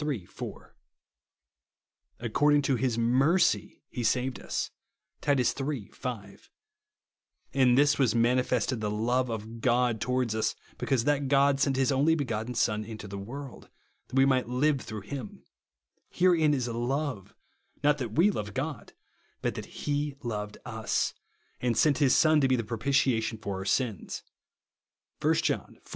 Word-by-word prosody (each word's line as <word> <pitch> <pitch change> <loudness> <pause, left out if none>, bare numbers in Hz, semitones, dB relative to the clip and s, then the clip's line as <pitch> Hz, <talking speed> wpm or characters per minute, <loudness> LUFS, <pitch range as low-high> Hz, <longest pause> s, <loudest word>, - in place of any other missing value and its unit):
4); - - -9 0.7
" - - -51
according 145 +5 +3
to 135 - +2
his 120 -1 0
mercy 135 +10 +2
he 120 - -5
saved 125 0 0
us," - - -3 0.5
(Titus 135 -5 +2
iii. 135 -7 -3
5); 105 -6 -7 0.5
" - - -46
in 130 -3 +4
this 145 +2 +4
was 125 -4 +3
manifested 125 0 +1
the 105 - -1
love 120 +4 0
of 115 +1 -6
God 120 -2 +2
towards 125 -2 0
us, 110 0 0 0.2
because 130 -4 +1
that 145 0 +1
God 140 0 +4
sent 140 -1 +2
his 135 +1 +2
only 145 +4 +3
begotten 120 -5 -3
Son 105 -1 +1
into 105 -1 -8
the 100 0 -6
world, 130 +6 -8 0.4
that - - -9
we 135 0 +6
mic^lit 130 -3 +2
live 135 +3 +1
through 110 -2 -6
him; 120 +1 -7 0.7
herein 165 -5 +3
is 125 -3 -1
love, 120 -1 -3 0.5
not 145 0 +3
that 120 -5 -4
we 180 - +4
loved 105 - -5
God, 145 +1 -4 0.5
but - - 0
that - - -7 0.2
he 145 -1 -1
loved 105 -3 -4
us, 110 -3 -1 0.5
and 120 -2 0
sent 150 -1 +3
his 140 -4 +4
Son 155 -1 +5
to 135 - +4
be 130 - +3
the 115 - -1
propitiation 115 0 +1
for 100 -3 -4
our 95 - -5
sins," 110 - -1 1.0
(1 160 +2 +3
John 155 -3 -1
iv. - - -28
125 Hz, 155 wpm, -28 LUFS, 115-140 Hz, 1.0 s, we